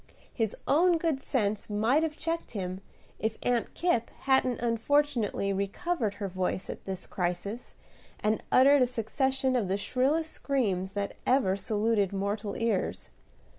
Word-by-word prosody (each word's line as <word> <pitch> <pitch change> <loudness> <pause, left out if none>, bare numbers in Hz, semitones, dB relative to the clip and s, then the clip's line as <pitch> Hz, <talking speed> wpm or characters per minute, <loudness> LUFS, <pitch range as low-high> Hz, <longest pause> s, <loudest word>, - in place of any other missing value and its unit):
His 220 -4 -1
own 340 +4 +4
good 320 -5 0
sense 215 -7 -1
might 220 +8 +2
have 320 -1 -2
checked 330 -4 -3
him, 185 0 -4 0.4
if 220 0 -1
Aunt 245 -2 0
Kipp 340 -10 +1
hadn't 265 -2 +2
unfortunately 235 -3 +1
recovered 210 - -1
her 205 -1 -3
voice 185 0 -2
at - - -10
this 190 -1 -4
crisis, 190 +5 -3 0.4
and 215 +1 +1
uttered 275 +2 +6
a 250 - +5
succession 260 +3 0
of 230 -6 +1
the 190 +2 0
shrillest 270 +10 +1
screams 195 -9 -1
that 200 -1 -3
ever 245 -8 +3
saluted 205 0 0
mortal 200 +1 -2
ears. 230 -5 -1
225 Hz, 140 wpm, -29 LUFS, 200-270 Hz, 0.4 s, uttered